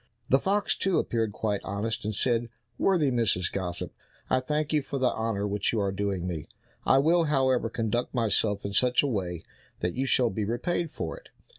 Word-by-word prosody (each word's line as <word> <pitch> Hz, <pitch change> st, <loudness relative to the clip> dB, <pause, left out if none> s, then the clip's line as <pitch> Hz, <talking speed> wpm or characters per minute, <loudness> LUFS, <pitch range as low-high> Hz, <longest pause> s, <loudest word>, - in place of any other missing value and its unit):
The 135 Hz, -, +5 dB
fox, 200 Hz, +4 st, +1 dB
too, 190 Hz, -3 st, +1 dB
appeared 115 Hz, -2 st, 0 dB
quite 105 Hz, -1 st, -2 dB
honest, 105 Hz, +3 st, -3 dB
and 105 Hz, -1 st, -2 dB
said, 120 Hz, +1 st, +1 dB, 0.3 s
"Worthy 165 Hz, -8 st, +3 dB
Mrs. 110 Hz, -8 st, +1 dB
Gossip, 90 Hz, -3 st, -3 dB, 0.4 s
I 130 Hz, -, +4 dB
thank 150 Hz, +3 st, -1 dB
you 150 Hz, -, +3 dB
for 140 Hz, -, -4 dB
the 130 Hz, -2 st, +2 dB
honour 110 Hz, -2 st, -1 dB
which 105 Hz, 0 st, 0 dB
you 115 Hz, -, 0 dB
are 100 Hz, -1 st, +1 dB
doing 95 Hz, -2 st, -2 dB
me; 80 Hz, -4 st, -4 dB, 0.4 s
I 135 Hz, -, +6 dB
will, 165 Hz, +4 st, +4 dB
however, 130 Hz, -5 st, +2 dB
conduct 115 Hz, +1 st, -1 dB
myself 110 Hz, -4 st, +1 dB
in 100 Hz, -, -3 dB
such 125 Hz, +4 st, +3 dB
a -, -, +1 dB
way 90 Hz, -9 st, -2 dB, 0.4 s
that 90 Hz, -, 0 dB
you 135 Hz, +2 st, -1 dB
shall 125 Hz, -2 st, +3 dB
be 105 Hz, +3 st, -2 dB
repaid 160 Hz, -, -1 dB
for -, -, -5 dB
it." -, -, -16 dB
115 Hz, 195 wpm, -28 LUFS, 100-135 Hz, 0.4 s, I